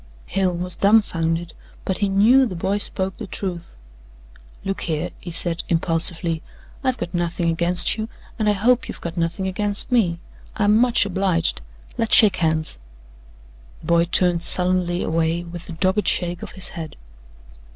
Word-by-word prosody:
Hale 185 -2 -1
was 180 0 -3
dumfounded, 170 -5 +1 0.3
but 190 - -2
he 200 - +1
knew 235 +7 +4
the 185 - -6
boy 195 +4 -1
spoke 190 -2 -1
the 215 - -7
truth. 180 -3 -6 0.9
"Look 195 0 -3
here," 160 +1 -2
he 175 - -9
said 170 0 -2
impulsively, 165 0 +2 0.4
"I've 260 -1 0
got 175 - -6
nothing 175 -1 -1
against 170 +2 +2
you, 220 +1 -4 0.3
and 215 -1 +2
I - - +3
hope 240 +5 +1
you've - - -8
got 170 0 -6
nothing 170 +3 -2
against 205 +4 -3
me. 185 -9 +2 0.4
I'm 210 0 +3
much 240 -1 +3
obliged 185 - 0 0.4
let's 225 - +4
shake 215 -4 +6
hands!" 160 - -1 1.0
The - - -13
boy 170 +1 +3
turned 175 0 +1
sullenly 180 0 +4
away 165 +1 -1
with 175 0 -10
a - - -5
dogged 190 +5 0
shake 175 -1 0
of - - -9
his 190 - -1
head. 160 -2 -8
180 Hz, 160 wpm, -21 LUFS, 170-200 Hz, 1.0 s, shake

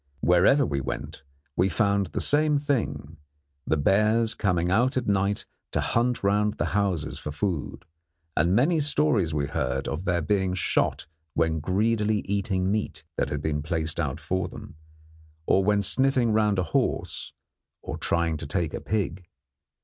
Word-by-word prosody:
Wherever 90 +11 +4
we 70 -8 -2
went 65 - -5 0.3
we 90 +2 +2
found 100 -3 +1
the - - -4
same 150 0 +3
thing, 140 - -2 0.5
the 80 - +2
bears 110 +8 +3
coming 90 -4 0
out 125 +6 +2
at 125 - -1
night 100 0 0 0.3
to - - +1
hunt 120 -1 0
round 105 +1 +2
the - - -1
houses 95 -7 -1
for 75 - -5
food; 80 -1 -3 0.5
and 85 +4 +2
many 155 +8 +3
stories 145 - +1
we 75 -2 0
heard 70 - -2
of 85 +5 -4
their 85 -3 +1
being 95 +1 +1
shot 90 - 0 0.3
when 80 -1 +1
greedily 105 +4 +1
eating 95 -1 0
meat 105 -7 -2
that - - -1
had - - -3
been 75 -1 -1
placed 80 0 -3
out 75 -2 -2
for 90 +3 -2
them, - - -11 0.7
or 95 - +3
when 105 +1 +2
sniffing 130 +2 +3
round 105 -2 +2
a 90 - +2
house 80 - -2 0.5
or - - -4
trying 85 -2 0
to 75 - -5
take 85 0 -1
a - - -4
pig. 95 -4 -2
95 Hz, 160 wpm, -26 LUFS, 85-110 Hz, 0.7 s, Wherever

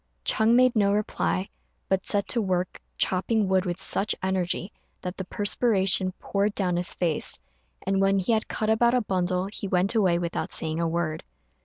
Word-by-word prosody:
Ch'êng 220 +2 +3
made 255 0 +4
no 200 -2 +3
reply, 95 - -1 0.4
but 190 0 0
set 200 -1 +3
to 235 - +2
work 185 -2 -2 0.2
chopping 200 +3 +1
wood 190 0 +2
with 175 +1 -3
such 210 +2 0
energy 190 0 -1 0.3
that 180 +1 -5
the 190 - -3
perspiration 195 -2 +1
poured 200 +2 -1
down 180 -3 +1
his 175 +1 -1
face; 165 -4 -1 0.5
and 195 0 +1
when 195 0 +3
he 190 +4 0
had 220 -1 +1
cut 215 0 -1
about 235 +2 +3
a 250 - +3
bundle 185 -2 0
he 200 0 -5
went 185 +2 +1
away 190 -7 +3
without 170 -1 -3
saying 160 0 -2
a 170 - +1
word. 165 -1 -2
190 Hz, 180 wpm, -26 LUFS, 180-210 Hz, 0.5 s, made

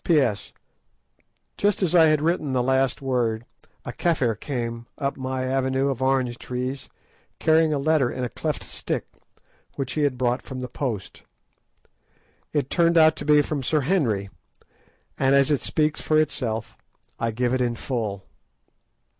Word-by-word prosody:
P.S.—Just 155 - -3
as 180 - +1
I 165 -2 +7
had 155 -1 +2
written 155 -4 0
the 125 -1 +2
last 130 +1 +1
word, 120 -4 0 0.4
a 120 - -5
Kafir 130 -5 +1
came 115 0 -4
up 140 0 -2
my 130 -1 -3
avenue 130 +1 0
of 130 -2 -3
orange 130 -2 +1
trees, 130 +2 -4 0.5
carrying 160 0 +3
a 150 - +1
letter 145 -2 +2
in 125 - -4
a 125 - -2
cleft - - -3
stick, - - -4 0.7
which 135 -2 -3
he 155 - -1
had 140 -3 +1
brought 125 0 0
from 130 -1 -7
the 125 - -4
post. 115 -8 -4 1.3
It 145 -3 -1
turned 170 0 +3
out 155 -1 +6
to 145 - -6
be 150 -1 +5
from 145 -1 -3
Sir 150 +4 +1
Henry, 120 - 0 0.9
and 135 0 +4
as 140 +1 +4
it 145 - +2
speaks 155 -1 0
for 155 0 +2
itself 120 -7 -2 0.4
I 115 - 0
give 120 +2 0
it 130 - +1
in 120 -1 0
full. 110 -7 -3
130 Hz, 155 wpm, -24 LUFS, 120-150 Hz, 1.3 s, I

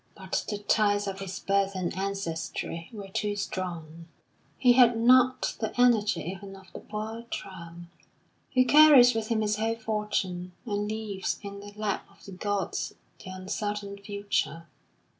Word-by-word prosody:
But 190 0 -3
the 205 - -2
ties 205 0 +2
of 195 -1 -4
his 190 -1 -5
birth 195 0 +1
and 180 -2 -2
ancestry 170 -4 -4
were 205 -4 -8
too 205 +2 -1
strong; 170 -4 -5 0.5
he 250 -2 +5
had 240 -2 +6
not 255 +2 +4
the 220 +2 -3
energy 235 -4 +4
even 195 +2 -7
of 190 -2 -16
the - - -7
poor 220 +2 -6
tramp, 170 -2 -7 0.7
who 255 0 +5
carries 285 -4 +8
with 225 -1 -2
him 225 -1 +1
his 210 0 0
whole 225 +1 0
fortune, 210 -5 -2
and 205 -2 -2
leaves 215 -3 -3
in 200 0 -7
the 205 0 -10
lap 210 -1 -2
of - - -20
the 195 - -9
gods 200 +1 -2 0.3
the - - -9
uncertain 200 +2 -4
future. 200 -5 -2
205 Hz, 155 wpm, -28 LUFS, 190-220 Hz, 0.7 s, carries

